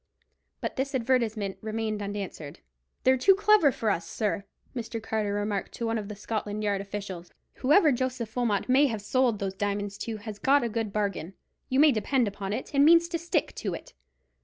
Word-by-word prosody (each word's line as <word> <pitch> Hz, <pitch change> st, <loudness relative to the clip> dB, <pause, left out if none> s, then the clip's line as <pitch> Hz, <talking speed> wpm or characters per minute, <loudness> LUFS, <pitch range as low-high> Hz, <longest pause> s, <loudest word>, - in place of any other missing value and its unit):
But -, -, -4 dB
this 270 Hz, +1 st, -1 dB
advertisement 225 Hz, -5 st, 0 dB
remained 220 Hz, -1 st, -2 dB
unanswered. 200 Hz, -7 st, -6 dB, 0.4 s
"They're 260 Hz, 0 st, +5 dB
too 390 Hz, +9 st, +6 dB
clever 415 Hz, -7 st, +5 dB
for 225 Hz, -3 st, 0 dB
us, 165 Hz, -3 st, -2 dB
sir," 205 Hz, -2 st, -2 dB, 0.3 s
Mr. 230 Hz, -1 st, -4 dB
Carter 220 Hz, -2 st, -2 dB
remarked 205 Hz, -1 st, -2 dB
to 235 Hz, -, -4 dB
one 225 Hz, 0 st, 0 dB
of 205 Hz, -, -6 dB
the 210 Hz, -, -6 dB
Scotland 210 Hz, 0 st, -3 dB
Yard 200 Hz, -2 st, 0 dB
officials. 195 Hz, -3 st, -6 dB, 0.3 s
"Whoever 300 Hz, +4 st, +5 dB
Joseph 250 Hz, -3 st, -2 dB
Wilmot 230 Hz, -5 st, 0 dB
may 270 Hz, +3 st, +5 dB
have 220 Hz, -5 st, -4 dB
sold 245 Hz, +1 st, +2 dB
those 195 Hz, -2 st, -3 dB
diamonds 205 Hz, 0 st, -3 dB
to 225 Hz, -2 st, -4 dB
has 210 Hz, -1 st, -8 dB
got 280 Hz, +3 st, +4 dB
a 235 Hz, -, 0 dB
good 225 Hz, -1 st, -2 dB
bargain, 195 Hz, -4 st, -2 dB, 0.3 s
you 260 Hz, -, +2 dB
may 300 Hz, 0 st, +7 dB
depend 245 Hz, +1 st, +1 dB
upon 200 Hz, -1 st, -4 dB
it, 255 Hz, +7 st, -4 dB
and 280 Hz, 0 st, +5 dB
means 335 Hz, +2 st, +6 dB
to 335 Hz, -1 st, -2 dB
stick 340 Hz, -2 st, -1 dB
to 195 Hz, -5 st, -2 dB
it. -, -, -11 dB
220 Hz, 190 wpm, -28 LUFS, 205-260 Hz, 0.4 s, may